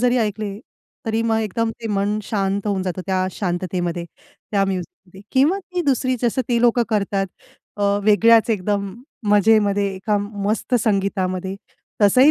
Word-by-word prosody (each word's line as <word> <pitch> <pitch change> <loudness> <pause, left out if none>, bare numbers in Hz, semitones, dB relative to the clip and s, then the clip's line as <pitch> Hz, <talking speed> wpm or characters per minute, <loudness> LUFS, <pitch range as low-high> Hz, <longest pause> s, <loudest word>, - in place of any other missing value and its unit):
जरी 250 +1 +3
ऐकले, 210 -2 -2 0.5
तरी 225 0 0
मग 225 -1 +1
एकदम 225 +2 -1
ते 225 - -4
मन 205 +2 0
शांत 200 0 -1
होऊन 195 -2 0
जातं, 185 0 -3
त्या 185 -1 +1
शांततेमध्ये. 175 -2 -2 0.5
त्या 200 -2 +2
म्युझिक 185 -3 -2 0.2
मध्ये 190 +2 -14
किंवा 295 +9 +3
ती 360 -1 -4
दुसरी 255 -1 +1
जसं 240 +2 +1
ते 235 -1 +2
लोकं 240 0 +4
करतात 200 -2 0 0.5
अ, 205 - -3 0.2
वेगळ्याच 225 +2 +5
एकदम 200 -1 -1 0.4
मजेमध्ये 205 -1 +4
एका 205 +2 0
मस्त 205 +4 -2
संगीतामध्ये, 195 -2 -1 0.5
तसंही 255 +9 +6
205 Hz, 145 wpm, -21 LUFS, 195-225 Hz, 0.5 s, तसंही